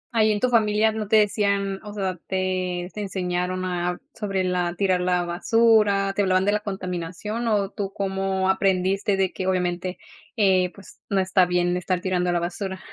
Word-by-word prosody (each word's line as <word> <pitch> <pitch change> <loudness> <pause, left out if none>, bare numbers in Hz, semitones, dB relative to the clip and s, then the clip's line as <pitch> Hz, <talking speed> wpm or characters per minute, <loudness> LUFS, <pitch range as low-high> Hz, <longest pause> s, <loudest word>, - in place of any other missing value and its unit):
Ahí 220 -1 +4
en 205 - 0
tu 250 +3 +1
familia, 220 -1 +3
¿no 215 -1 -4
te 220 - +3
decían?, 200 -2 +2
o 210 - -8
sea, 190 -3 -3
te 185 -1 -1
te 210 - -5
enseñaron 185 -1 -2
a 180 -1 -2
sobre 195 -3 -2
la 180 -1 -1
tirar 185 -1 +1
la 180 -1 +1
basura, 200 +1 +3
te 205 - 0
hablaban 185 -1 +2
de 205 - +3
la 210 - +1
contaminación, 190 +3 -4
o 205 -2 +1
tú 195 -1 -4
cómo 190 -1 -1
aprendiste 190 +1 +1
de 190 -1 0
que, 185 - -4
obviamente, 180 0 -1 0.4
eh, 185 -4 +3
pues, 200 - -15
no 200 - +1
está 185 -1 +3
bien 175 0 +1
estar 180 0 -1
tirando 180 -1 0
a - - +1
la 175 - +1
basura? 190 +2 -4
190 Hz, 185 wpm, -24 LUFS, 180-205 Hz, 0.4 s, Ahí